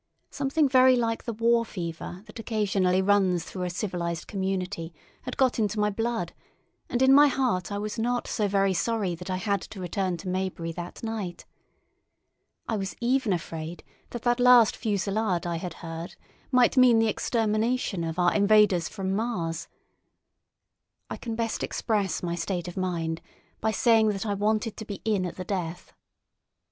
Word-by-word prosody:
Something 285 +2 +1
very 260 -1 +6
like 230 -2 -1
the 235 - -2
war 230 +1 +3
fever 175 -2 -6
that 220 +1 -11
occasionally 195 -5 +1
runs 190 -4 +3
through 185 -1 -5
a - - -2
civilised 170 -3 -3
community 190 -3 -3 0.3
had - - -6
got 260 -3 +2
into 210 -1 0
my 210 0 +2
blood, 225 -4 -2 0.6
and 245 +1 +1
in 265 +1 +6
my 290 +1 +8
heart 250 -10 0
I 200 - -2
was 210 +2 -4
not 245 +2 0
so 210 -2 0
very 195 -1 +2
sorry 205 0 0
that 180 +2 -8
I 185 - 0
had 200 +1 -1
to 200 - -9
return 185 0 -2
to 185 - -9
Maybury 185 -2 -2
that 175 +5 -8
night. 215 -6 -4 1.2
I 220 - -1
was 195 -1 -4
even 250 -2 +1
afraid 165 -1 -4 0.3
that 240 - -7
that 240 0 +2
last 245 -3 +6
fusillade 200 -4 -1
I 170 -1 -1
had 170 -1 -6
heard 165 +1 -6 0.4
might 250 0 +4
mean 250 -2 +7
the 225 0 +3
extermination 220 -2 0
of 165 0 -3
our 175 -1 +3
invaders 200 -4 +4
from 190 -2 -3
Mars. 180 -8 -2 1.4
I - - -3
can 230 -2 -5
best 230 -1 -2
express 205 -6 -1
my 170 -1 -1
state 175 0 -3
of 175 - -7
mind 170 -3 -2 0.4
by 220 - 0
saying 225 -1 +4
that 200 0 -2
I 205 - 0
wanted 215 +2 0
to 220 - -6
be 205 -2 -7
in 200 -5 +1
at - - -7
the 185 - -6
death. 175 -3 -4
200 Hz, 170 wpm, -27 LUFS, 180-225 Hz, 1.4 s, my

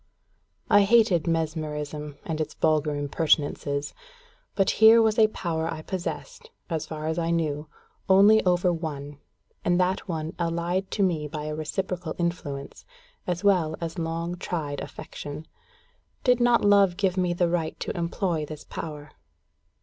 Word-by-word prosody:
I 205 - +6
hated 200 -5 +4
mesmerism 150 -2 -3
and 160 -2 -2
its 155 - -4
vulgar 155 -1 +1
impertinences; 145 -1 0 0.6
but 195 -2 +3
here 220 +1 +9
was 220 0 +3
a 215 - +7
power 165 -5 -3
I 155 -1 -6
possessed, 465 - -5 0.2
as 160 -2 -2
far 155 -1 -6
as 160 +2 -1
I 165 0 -1
knew, 155 -3 -1 0.4
only 205 +3 +6
over 180 -1 +2
one, 145 -3 -6 0.4
and 175 0 +2
that 185 +2 0
one 160 -2 -3
allied 170 +3 -1
to 200 - 0
me 160 -5 0
by 150 0 -5
a 155 0 -4
reciprocal 175 +1 -3
influence, 165 -5 -4 0.4
as 180 +1 -2
well 175 -6 +3
as 165 +1 -4
long 165 +2 -3
tried 150 -6 -3
affection. 145 +2 -8 0.8
Did 250 -1 +4
not 240 -2 +4
love 200 -3 +5
give 190 -3 +1
me 180 -2 +1
the 175 0 +2
right 170 -2 -2
to - - -3
employ 170 -1 -1
this 155 -1 -8
power? 150 -2 -7
170 Hz, 150 wpm, -26 LUFS, 155-185 Hz, 0.8 s, here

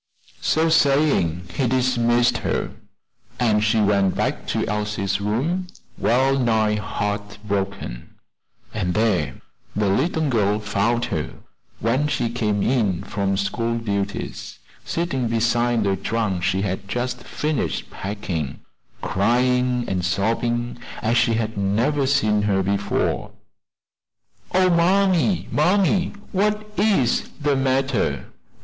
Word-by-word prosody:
So 160 +1 +2
saying 140 - +2
he 130 - 0
dismissed 120 -1 +2
her, - - -2 0.7
and 110 -4 +2
she 110 +1 +2
went 100 -2 +2
back - - -2
to - - 0
Elsie's 105 -2 -1
room 145 - -1 0.3
wellnigh 120 -4 +2
heart 105 0 -3
broken; 100 -11 -4 0.6
and 90 -5 -1
there 90 -11 +1 0.4
the 105 -1 +1
little 155 - +1
girl 105 -5 +1
found 110 +3 0
her - - -3 0.4
when 130 +6 +1
she 125 -5 -1
came 105 -4 0
in 105 -8 +1
from 100 -1 -1
school 115 +4 -1
duties, 100 -3 -4 0.3
sitting 135 -8 -1
beside 120 0 +1
the 100 -1 +1
trunk 100 -1 -1
she 95 +2 0
had 95 0 -3
just 120 +2 -3
finished 150 -3 -2
packing, 90 -8 -4 0.4
crying 125 +4 +1
and 90 -2 -1
sobbing 120 +6 -1 0.2
as 115 +2 +2
she 115 -2 +3
had 110 -2 -2
never 120 +9 +1
seen 110 -6 +2
her 100 -2 +1
before. 100 +1 -1 1.2
"Oh, 185 0 +4
mammy, 185 +1 +3
mammy! 185 +3 +2 0.2
what 210 +2 +1
is 195 - +2
the 145 -1 +1
matter? 135 -2 0
115 Hz, 115 wpm, -22 LUFS, 100-135 Hz, 1.2 s, Oh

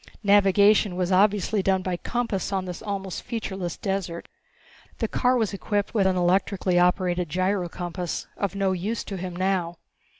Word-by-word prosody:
Navigation 200 -1 +4
was 180 0 -1
obviously 200 +2 +3
done 190 -1 +1
by 185 -1 -1
compass 220 -1 -2
on 190 -1 -1
this 180 -1 -6
almost 195 -4 -4
featureless 190 -7 -4
desert. 190 -4 -3 0.7
The - - -1
car 250 0 +2
was 220 -4 0
equipped 205 +1 -2
with 200 -4 +3
an 190 - +1
electrically 180 0 +2
operated 180 -1 +1
gyrocompass, 180 -1 -2
of 200 -2 -2
no 195 -1 +1
use 195 +5 -2
to 195 - -6
him 180 -1 -5
now. 180 -2 -1
190 Hz, 155 wpm, -25 LUFS, 180-200 Hz, 0.7 s, Navigation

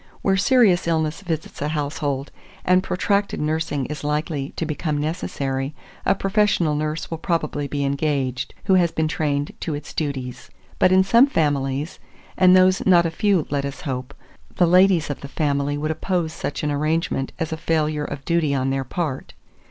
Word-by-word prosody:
Where 195 - +3
serious 200 -4 +4
illness 160 0 0
visits 160 -7 -5
a 145 - 0
household, 145 -2 -2 0.3
and 185 +1 +4
protracted 200 +2 0
nursing 155 -2 -1
is 150 +2 -6
likely 150 -1 -2
to 165 - -2
become 155 0 -2
necessary, 145 -3 -3 0.3
a - - +4
professional 195 -5 +1
nurse 155 +2 -3
will 165 - -4
probably 155 -4 -1
be 140 0 -2
engaged, 140 -3 -1
who 190 - +2
has 175 -3 +4
been 160 -1 0
trained 145 -2 -1
to 160 - -3
its 145 0 -8
duties; 135 -5 -4 0.3
but 185 - +5
in 190 0 +6
some 235 +7 +5
families, 145 - -1 0.4
and 185 0 +6
those 185 0 +4
not 175 -2 +6
a 165 - 0
few 190 -2 +1
let 140 -1 0
us 140 0 -5
hope, 130 0 -5 0.4
the 175 - +4
ladies 180 -2 +4
of 145 - -6
the 140 - -6
family 145 0 -1
would 155 +2 -1
oppose 170 -1 -1
such 145 - -4
an 150 - 0
arrangement 155 -1 -1
as 160 -1 -3
a - - -1
failure 155 -2 0
of 140 -1 -7
duty 165 -4 +1
on 135 0 0
their 135 0 -1
part. 130 - -4
155 Hz, 175 wpm, -22 LUFS, 145-175 Hz, 0.4 s, in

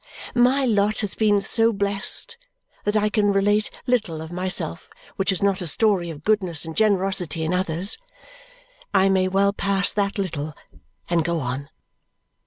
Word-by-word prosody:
My 255 +3 +3
lot 210 -2 +2
has 205 -3 -2
been 205 -2 +2
so 225 +3 +3
blest 200 - +2 0.5
that 210 +1 0
I 210 0 +2
can 205 -1 +1
relate 205 +2 +1 0.2
little 220 -11 0
of 160 +1 -8
myself 175 -3 -2 0.3
which 195 0 0
is 190 0 -3
not 200 -1 +1
a 175 - -4
story 190 0 +1
of 155 -2 -9
goodness 185 -7 0
and 160 -1 -7
generosity 190 -6 0
in 160 +3 -1
others. 180 - -1 1.0
I 195 0 +4
may 190 -1 +2
well 195 +1 +2
pass 195 -1 +1
that 200 -1 -1
little 155 -6 -4 0.5
and 170 -2 +1
go 170 0 -1
on. 135 +1 -4
195 Hz, 160 wpm, -23 LUFS, 170-210 Hz, 1.0 s, I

